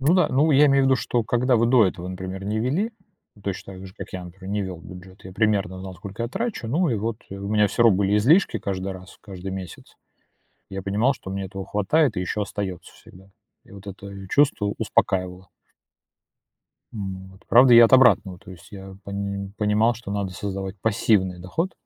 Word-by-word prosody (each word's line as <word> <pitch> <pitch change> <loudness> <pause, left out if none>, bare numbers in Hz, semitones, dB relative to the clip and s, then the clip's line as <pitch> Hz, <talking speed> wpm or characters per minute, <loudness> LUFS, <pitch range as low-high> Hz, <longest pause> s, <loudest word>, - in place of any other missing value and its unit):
Ну 145 +6 +3
да, 180 -4 +3
ну, 145 +5 +2
я 145 +1 +6
имею 140 -1 +4
в - - +3
виду, 130 -1 +4
что 120 -1 -1
когда 125 +2 +2
вы 115 - +3
до 120 -3 +5
этого, 90 -1 -4
например, 95 +1 -6
не 105 +2 -1
вели, 150 - 0 0.5
точно 95 0 -5
так 95 +1 -10
же, 95 - -14
как - - -9
я, 90 -1 -6
например, 95 +2 -10
не 105 -1 0
вел 95 -2 -5
бюджет, 95 +2 -13
я 95 - -9
примерно 100 -3 0
знал, 95 0 -8
сколько 100 +5 -7
я 115 - -2
трачу, 220 - -4
ну 170 +7 +1
и - - +1
вот, 110 +2 -2
э, 100 - -6
у 100 0 -6
меня 105 0 +3
всё 120 - 0
равно 110 -5 +5
были 100 +1 +2
излишки 130 - +3
каждый 95 -1 -4
раз, 95 0 -12
каждый 95 -2 -8
месяц. 95 -3 -9 0.7
Я 95 0 -6
понимал, 105 +8 +1
что 95 - -10
мне 95 0 -3
этого 95 0 -7
хватает 110 +6 +1
и - - 0
еще 90 +3 -2
остается 100 -3 -5
всегда, 95 +2 -17 0.3
и - - -21
вот 100 0 -13
это 100 0 -9
чувство 115 -7 +2
успокаивало. 95 -4 -1 1.4
М, 95 -3 -6
вот. 95 +1 -19
Правда, 120 +1 +7
я 115 0 +10
от - - -7
обратного, 105 -8 +5
то 95 - -14
есть 90 -3 -13
я 95 -1 -10
пони 100 0 -4
понимал, 105 +2 +2
что 115 -3 -9
надо 100 -2 -2
создавать 95 +1 -5
пассивный 100 -4 +1
доход. 165 - -3
100 Hz, 205 wpm, -23 LUFS, 95-115 Hz, 1.4 s, я